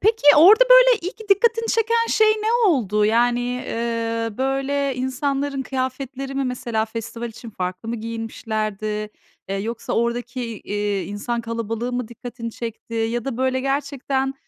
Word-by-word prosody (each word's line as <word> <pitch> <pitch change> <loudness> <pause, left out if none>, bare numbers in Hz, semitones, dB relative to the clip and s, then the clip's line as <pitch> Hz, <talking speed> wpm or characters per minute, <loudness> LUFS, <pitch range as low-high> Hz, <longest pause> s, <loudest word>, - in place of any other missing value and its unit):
peki 445 +3 +2
orada, 415 +11 +8
böyle, - - +8
ilk 410 +4 -7
dikkatini 460 +3 +3
çeken 460 0 +2
şey 435 0 +4
ne 430 +1 -1 0.2
oldu? 210 - +2
Yani, 240 +3 +3 0.3
iii, 230 -1 -2
böyle, 270 +1 0
insanların 275 +2 -2
kıyafetleri 265 +1 -4
mi? 275 0 0
Mesela 240 -3 -1
festival 230 +1 -6
için 230 +1 -10
farklı 185 +2 -5
mı 235 - -2
giyinmişlerdi? 215 -2 -3 0.4
Eee, 195 - -2
yoksa 225 +3 -4
oradaki, 235 -1 -2
iii, 205 -1 -1
insan 220 +4 -3
kalabalığı 230 +1 -3
mı 245 -2 -2
dikkatini 235 -1 -7
çekti? 230 0 -7
Ya 225 +1 -1
da, 270 -4 -3
böyle, 260 0 0
gerçekten 275 -1 -1
245 Hz, 140 wpm, -22 LUFS, 225-275 Hz, 0.4 s, orada